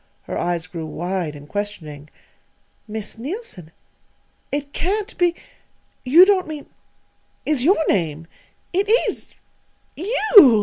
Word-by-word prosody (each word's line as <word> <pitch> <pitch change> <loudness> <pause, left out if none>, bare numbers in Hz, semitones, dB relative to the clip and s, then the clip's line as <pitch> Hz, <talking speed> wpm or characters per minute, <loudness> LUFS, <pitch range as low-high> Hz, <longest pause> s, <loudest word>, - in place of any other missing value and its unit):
Her - - -6
eyes 175 -2 -1
grew 165 -3 -6
wide 175 -1 -3
and 145 0 -12
questioning. 155 -7 -6 0.8
"Miss 215 0 -6
Neilson 270 - -6 0.8
it 285 0 -3
can't 400 +4 -2
be 350 -1 +3 0.7
you 315 +9 +8
don't 380 -3 +2
mean 305 -2 -6 0.8
is 295 -5 +1
your 365 +8 +5
name 165 -4 0 0.5
it 390 +3 +1 0.2
_is - - -5 0.6
you! 420 +7 -2
220 Hz, 115 wpm, -21 LUFS, -, 0.8 s, you